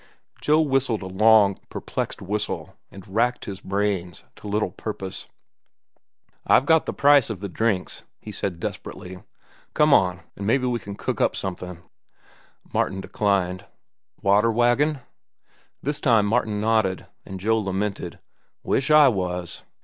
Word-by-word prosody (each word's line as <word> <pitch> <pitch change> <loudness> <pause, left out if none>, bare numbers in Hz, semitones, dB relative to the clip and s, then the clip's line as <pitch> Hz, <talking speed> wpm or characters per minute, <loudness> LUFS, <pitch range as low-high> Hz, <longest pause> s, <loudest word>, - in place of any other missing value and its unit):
Joe 155 +1 +4
whistled 135 -7 0
a - - -5
long, 100 +1 +4
perplexed - - -4
whistle, 105 +2 -3
and 100 +2 -13
racked 115 +5 0
his 95 -2 -7
brains 95 -3 -2
to - - -10
little 105 -2 0
purpose. 95 -1 -6 1.2
"I've 130 - +5
got 160 +1 +3
the - - 0
price 145 -3 +4
of 110 -5 -4
the 100 - -4
drinks," 100 -1 -1 0.2
he 105 - -9
said 95 -4 -4
desperately. 90 +2 -7 0.5
"Come 150 -1 +5
on, 90 -5 +3
an' 100 - -5
mebbe 130 +4 +2
we'll 120 -5 -2
cook - - -3
up - - +2
something." 90 -2 -5 0.9
Martin 95 - 0
declined. 95 -3 -1 0.6
"Water 105 +3 +4
wagon?" 120 +5 +2 0.8
This 145 +2 -2
time 115 -5 +3
Martin 110 -1 0
nodded, 110 -4 +1 0.2
and 95 -1 -8
Joe 110 +4 +2
lamented, 100 -2 -3 0.5
"Wish 135 +2 0
I 150 -1 +7
was." 90 -6 -2
105 Hz, 135 wpm, -24 LUFS, 95-120 Hz, 1.2 s, I